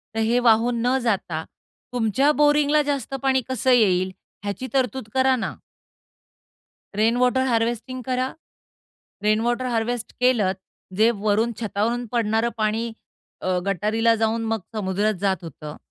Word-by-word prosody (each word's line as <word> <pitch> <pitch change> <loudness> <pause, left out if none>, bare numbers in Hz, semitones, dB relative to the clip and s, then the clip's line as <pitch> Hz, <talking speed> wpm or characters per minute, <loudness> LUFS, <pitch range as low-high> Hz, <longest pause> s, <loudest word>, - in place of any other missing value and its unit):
तर - - -1
हे 240 +2 +3
वाहून 235 0 +3
न 255 +2 +3
जाता 185 -8 -1 0.5
तुमच्या 245 +5 +2
बोरिंगला 295 0 +4
जास्त 280 -3 -3
पाणी 265 -1 +3
कसं 260 0 +1
येईल 190 -6 +3 0.3
ह्याची 205 +6 -4
तरतूद 260 -3 0
करा 260 0 +3
ना? 235 - -4 1.4
रेनवॉटर 245 +4 +2
हार्वेस्टिंग 240 +2 -1
करा. 255 +1 -1 0.9
रेनवॉटर 230 +4 +1
हार्वेस्ट 240 -1 -2
केलंत. 230 -7 +2 0.4
जे 220 +2 +5
वरून 215 +2 0
छतावरून 230 +3 -1
पडणारं 225 -1 +1
पाणी 220 +1 -1 0.5
अ, - - -4 0.2
गटारीला 215 +4 +2
जाऊन 225 +1 0
मग 225 0 -1 0.2
समुद्रात 205 +1 0
जात 190 -4 0
होतं. 155 -2 -8
230 Hz, 125 wpm, -23 LUFS, 215-250 Hz, 1.4 s, जे